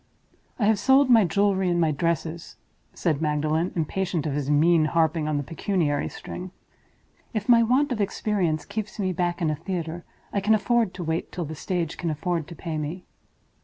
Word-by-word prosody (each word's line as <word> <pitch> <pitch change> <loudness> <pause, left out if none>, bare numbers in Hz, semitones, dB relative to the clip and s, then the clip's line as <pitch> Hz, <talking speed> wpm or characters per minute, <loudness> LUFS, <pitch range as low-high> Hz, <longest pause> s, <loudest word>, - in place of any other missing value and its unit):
"I 220 - +1
have 215 -1 +3
sold 270 +2 +4
my 225 -4 +7
jewelry 190 +1 +2
and 175 0 +1
my 160 -2 +3
dresses," 165 +2 -2 0.4
said 155 -4 -1
Magdalen, 155 +3 0
impatient 170 0 -1
of 150 - -1
his 145 -1 -2
mean 155 +2 +4
harping 160 -1 +1
on 155 -1 0
the 145 - -1
pecuniary 165 -2 -1
string. 180 +1 -7 0.9
"If 210 -1 -2
my 235 -2 +7
want 255 +5 +2
of 225 -4 -1
experience 185 -7 0
keeps 215 -1 -5
me 190 -3 -1
back 175 0 -1
in 155 - +2
a - - -1
theater, 170 0 -4 0.3
I 200 - +1
can 215 +3 +4
afford 225 -1 +1
to 180 - -5
wait 160 0 -2
till 175 -2 -4
the 155 - -6
stage 165 +1 -3
can 170 - -1
afford 160 +1 -2
to 170 - -9
pay 160 -1 -4
me." 160 +5 -5
175 Hz, 190 wpm, -25 LUFS, 155-200 Hz, 0.9 s, my